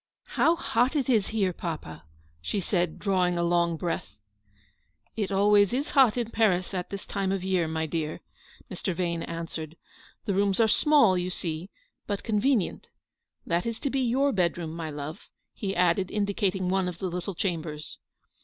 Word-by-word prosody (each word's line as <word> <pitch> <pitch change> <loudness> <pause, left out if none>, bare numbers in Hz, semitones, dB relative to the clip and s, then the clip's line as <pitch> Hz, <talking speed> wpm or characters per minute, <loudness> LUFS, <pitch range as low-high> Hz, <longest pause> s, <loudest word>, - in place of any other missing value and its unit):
" - - -66
How 330 - +5
hot 250 -3 +1
it 275 -3 0
is 220 -6 +3
here, 200 -5 0
papa/' 155 - -5 0.4
she 200 - -2
said, 175 -3 0
drawing 180 -3 +1
a 170 - +1
long 170 -1 +2
breath. 170 +1 -3 0.5
" - - -42
It 200 - -4
always 205 +1 +4
is 275 +4 -1
hot 260 -5 +5
in 235 -2 -2
Paris 190 -5 +2
at 180 -1 -3
this 200 0 -6
time 195 -2 -1
of 195 -2 -1
year, 185 -3 +1
my 160 0 -1
dear," 155 -1 -3 0.5
Mr. 185 - -3
Vane 170 -1 -1
answered; 165 -1 -5 0.2
" - - -27
the 200 - 0
rooms 200 +1 +2
are 225 - +5
small, 230 -7 +5
you 180 +1 -2
see, 170 0 -4 0.4
but 205 -2 -2
convenient. 220 -1 +1 0.6
That 170 +5 0
is 230 -1 -3
to 280 - -1
be 270 - 0
your 260 +3 +2
bed 180 -6 +1
room, 165 -2 -4
my 165 -2 -4
love," 150 +4 -7 0.2
he 195 -2 -3
added, 180 +1 +2
indicating 200 -2 0
one 190 0 +1
of 180 -2 -5
the 190 - -4
little 180 +1 -3
chambers. 160 -4 -4
185 Hz, 180 wpm, -27 LUFS, 170-210 Hz, 0.6 s, How